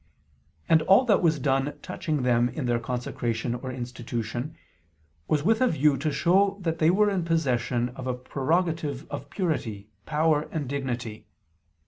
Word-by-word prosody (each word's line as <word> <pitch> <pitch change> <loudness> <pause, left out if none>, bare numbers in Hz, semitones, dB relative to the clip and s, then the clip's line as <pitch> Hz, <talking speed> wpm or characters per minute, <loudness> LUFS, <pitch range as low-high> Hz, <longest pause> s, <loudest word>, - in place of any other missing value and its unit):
And 160 -1 +5
all 195 +10 +5
that 215 -5 +3
was 160 -3 +3
done 135 +1 0
touching 150 -5 -2
them 120 -1 +3
in 125 +3 -4
their 120 -1 +1
consecration 120 0 -2
or 130 +2 -5
institution, 120 +2 -5 0.7
was 150 -2 +1
with 220 +6 +2
a 255 - +5
view 150 - +3
to 155 +2 -1
show 195 +7 +3
that 165 -2 -2
they 155 - +4
were 205 +3 +3
in 190 -3 0
possession 125 -7 0
of 130 +1 -8
a 125 - 0
prerogative 150 +2 -1
of - - -6
purity, 115 - -3 0.2
power 155 0 +1
and 150 -4 -3
dignity. 125 -5 -4
140 Hz, 155 wpm, -26 LUFS, 125-165 Hz, 0.7 s, And